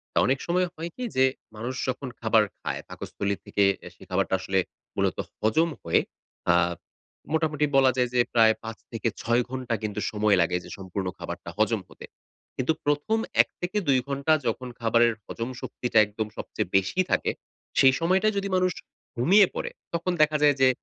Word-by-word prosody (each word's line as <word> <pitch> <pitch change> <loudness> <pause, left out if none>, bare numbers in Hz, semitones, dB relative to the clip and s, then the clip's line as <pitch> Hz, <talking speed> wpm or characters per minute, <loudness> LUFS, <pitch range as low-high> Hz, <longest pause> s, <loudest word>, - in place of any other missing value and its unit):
তা - - +5
অনেক 130 +1 +2
সময় 180 +1 +2
হয় 165 0 -5
কি 255 - -6
যে 130 0 +5 0.3
মানুষ 120 +4 -4
যখন 130 +2 -3
খাবার 110 -1 +4 0.2
খায়, - - -3
পাকস্থলী 100 0 -3
থেকে 100 - +1 0.2
এ - - -7
সে - - -16
খাবারটা - - 0
আসলে 95 +1 0 0.4
মূলত - - 0 0.2
হজম 135 +11 +3
হয়ে 85 - +3 0.5
আ - - +5 0.8
মোটামুটি 155 -2 +1
বলা 135 -1 +6
যায় 125 -1 +2
যে 125 - +2
প্রায় 110 -2 +6
৫ 115 0 -6
থেকে 115 0 -2
৬ 120 +1 +2
ঘন্টা 130 -2 -3
কিন্তু 105 -1 -3
সময় 105 -1 +3
লাগে 90 +1 +1
যে - - -11
সম্পূর্ণ 95 0 -4
খাবারটা - - -6
হজম - - +2
হতে। - - -11 0.5
কিন্তু 130 +5 +1
প্রথম 145 +10 +1 0.2
১-২ 180 -7 0
ঘন্টা 140 +3 +1
যখন 120 +3 -2
খাবারের 115 0 +3
হজম 115 +1 -5
শক্তিটা 125 -2 -2
একদম 105 +1 -4
সবচেয়ে 90 - -4
বেশি 95 - -1
থাকে। - - +2 0.5
সেই 130 -1 +7
সময়টায় 190 +6 +2
যদি 200 0 -1
মানুষ 185 0 +2 0.4
ঘুমিয়ে 185 - +6
পড়ে - - -2 0.2
তখন 170 +2 0
দেখা 155 0 +4
যায় 145 -1 +5
যে 130 - +7
130 Hz, 170 wpm, -26 LUFS, 110-160 Hz, 0.8 s, সেই